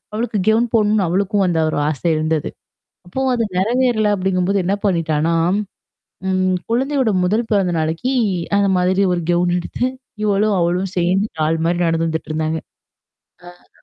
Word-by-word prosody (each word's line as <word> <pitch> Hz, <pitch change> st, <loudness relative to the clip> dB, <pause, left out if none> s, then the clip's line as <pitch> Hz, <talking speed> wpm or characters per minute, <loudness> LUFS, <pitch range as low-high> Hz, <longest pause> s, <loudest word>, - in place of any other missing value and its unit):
அவளுக்கு 225 Hz, +1 st, -2 dB
கவுன் 225 Hz, +2 st, +3 dB
போடணும்னு 210 Hz, -2 st, +3 dB
அவளுக்கும் 195 Hz, +3 st, +1 dB
அந்த 175 Hz, -2 st, 0 dB
ஒரு -, -, -2 dB
ஆசை 155 Hz, +2 st, -3 dB
இருந்தது. 155 Hz, -1 st, -1 dB, 0.6 s
அப்பவும் 260 Hz, +8 st, -1 dB
அது 235 Hz, -2 st, 0 dB
நெறவேறல 225 Hz, +1 st, +2 dB
அப்படிங்கும்போது 190 Hz, 0 st, 0 dB
என்ன 190 Hz, -, +1 dB
பண்ணிட்டனா, 165 Hz, -3 st, +1 dB, 0.9 s
ம் 185 Hz, 0 st, +1 dB, 0.2 s
குழந்தையோட 265 Hz, 0 st, +1 dB
முதல் 220 Hz, +5 st, 0 dB
பிறந்த 195 Hz, -4 st, +2 dB
நாளக்கி 165 Hz, +12 st, -1 dB, 0.5 s
அந்த 200 Hz, -1 st, +2 dB
மாதிரி 185 Hz, +2 st, +2 dB
ஒரு 175 Hz, -, 0 dB
கவுன் 175 Hz, 0 st, +2 dB
எடுத்து, 180 Hz, +7 st, -4 dB, 0.4 s
இவளும், 205 Hz, 0 st, +2 dB
அவளும் 180 Hz, +2 st, 0 dB
சேர்ந்து 185 Hz, +4 st, +1 dB
டால் 160 Hz, +1 st, +1 dB
மாரி 175 Hz, +1 st, 0 dB
நடந்து 165 Hz, 0 st, 0 dB
வந்துட்டுருந்தாங்க. 160 Hz, 0 st, -2 dB, 0.9 s
ஆ. 175 Hz, 0 st, -19 dB
185 Hz, 140 wpm, -19 LUFS, 170-215 Hz, 0.9 s, கவுன்